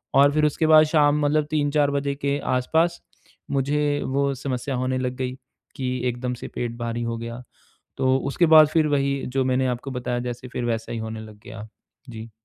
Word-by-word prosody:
और 140 +1 +6
फिर 155 0 +2
उसके 155 +2 +1
बाद 155 0 +8
शाम 150 -1 +3
मतलब 150 +1 +2
3-4 145 -1 +1
बजे 140 0 -1
के 140 0 -1 0.2
आसपास, 160 +7 +1 0.5
मुझे 145 +1 0
वो 140 +1 0
समस्या 130 0 -3
होने 130 +1 -1
लग 125 0 -2
गई 130 -1 -3 0.4
कि 130 -1 -2
एकदम 125 +1 -3
से - - -8
पेट 120 -1 -3
भारी 120 0 -3
हो 115 0 -3
गया। 115 +2 -7 0.5
तो 130 0 +2
उसके 170 +5 +2
बाद 155 -1 +8
फिर 155 0 +2
वही, 140 -1 +1
जो 130 +1 -1
मैंने 130 0 +1
आपको 125 +2 -4
बताया 125 -1 -3
जैसे, 120 +1 -7
फिर 125 - -4
वैसा 115 -1 -2
ही 115 - -3
होने 110 0 -5
लग 110 -1 -12
गया। 110 -3 -9 0.4
जी। 115 0 -9
130 Hz, 195 wpm, -23 LUFS, 120-145 Hz, 0.5 s, बाद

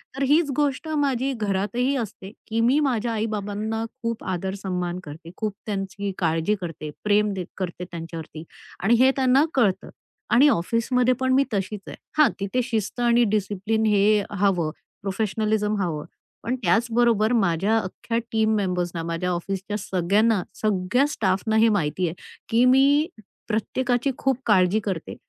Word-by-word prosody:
तर 275 - -1
हीच 295 +2 +3
गोष्ट 290 +1 0
माझी 275 -2 +1
घरातही 220 +5 -1
असते, 205 -4 -6 0.2
की 225 0 -1
मी 250 +6 +4
माझ्या 245 -5 0
आई-बाबांना 215 0 -2 0.2
खूप 230 -1 -3
आदर-सन्मान 185 -1 -3
करते, 160 +3 -10
खूप 215 -2 -2
त्यांची 200 -1 -3
काळजी 165 +4 +1
करते, 165 -3 -6
प्रेम 210 0 +2
दे 185 -2 -4
करते 180 -1 -4
त्यांच्यावरती 165 -1 -7 0.4
आणि 225 +4 +4
हे 260 +1 +6
त्यांना 265 +1 +4
कळतं. 200 -8 +1 0.4
आणि 265 +5 +7
ऑफिसमध्ये 240 +6 +1
पण 260 0 +1
मी 275 +1 +5
तशीच 200 +1 -2
आहे. - - -7 0.2
हां. 305 -1 +6
तिथे 200 +6 -1
शिस्त 230 -1 -3
आणि 240 0 +4
डिसिप्लिन 210 +2 0
हे 210 0 +3
हवं, 185 -6 +1 0.3
प्रोफेशनलिझम 210 +1 0
हवं. 155 -5 -2 0.4
पण 250 +2 -1
त्याचबरोबर 230 -1 +2
माझ्या 195 +1 +2
अख्ख्या 225 +3 -3
टीम 220 -1 +2
मेंबर्सना, 180 -4 -1
माझ्या 170 +2 -2
ऑफिसच्या 195 +4 -3
सगळ्यांना, 195 +3 +1 0.2
सगळ्या 210 +5 +2
स्टाफना 220 -3 0
हे 225 +1 +5
माहिती 180 -3 0
आहे, 160 - -3 0.4
की 230 +2 +3
मी 275 +4 +5 0.4
प्रत्येकाची 245 +4 0
खूप 265 -2 +1
काळजी 190 -1 +4
करते 185 -6 -4
210 Hz, 140 wpm, -24 LUFS, 190-240 Hz, 0.4 s, आणि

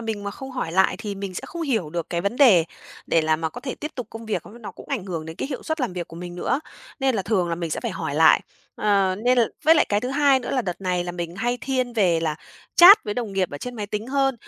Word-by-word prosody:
mình 220 -3 -4
mà 200 - -3
không 265 +5 -9
hỏi 250 -11 -4
lại 190 +2 +3
thì 210 -3 -5
mình 195 -1 -6
sẽ - - -4
không 340 0 -6
hiểu 225 - -1
được 170 0 -4
cái 170 - -1
vấn 200 +6 -2
đề 220 - +6 0.4
để 165 - +3
là 155 0 +2
mà 160 0 -2
có 240 - -9
thể 260 0 -5
tiếp 300 - -6
tục 250 -4 -5
công 225 0 -9
việc, 215 - -2 0.2
nó 215 - -7
cũng - - -13
ảnh 260 -9 -2
hưởng 165 -5 -5
đến 160 0 -8
cái - - -4
hiệu 265 -4 -5
suất 315 0 -3
làm 250 -7 -1
việc 175 -2 -5
của 165 - -11
mình 175 0 -7
nữa, 215 +9 -1 0.4
nên 265 -1 +2
là 200 - -1
thường 185 -3 0
là 170 - 0
mình 165 -1 -4
sẽ - - -2
phải 235 - -3
hỏi 165 -5 -4
lại. 160 +1 +6 0.4
Ờ, 195 -3 +2
nên 250 0 +4
l - - +6 0.2
với 320 +2 +7
lại - - +4
cái 205 0 +1
thứ 250 - -3
hai 280 -1 +4
nữa 245 - -5
là 255 - 0
đợt 180 -4 -5
này 180 -2 -1
là 175 - -4
mình 175 0 -5
hay 240 +4 -1
thiên 255 -2 -1
về 185 -8 +2
là 155 -2 -1 0.4
chat 385 +5 +9
với 210 - -3
đồng 230 -4 -3
nghiệp 190 -2 0
ở 145 - -6
trên 245 +7 -6
máy 210 -2 -4
tính 210 +2 -4
hơn, 270 -1 +1
205 Hz, 300 wpm, -23 LUFS, 175-250 Hz, 0.4 s, chat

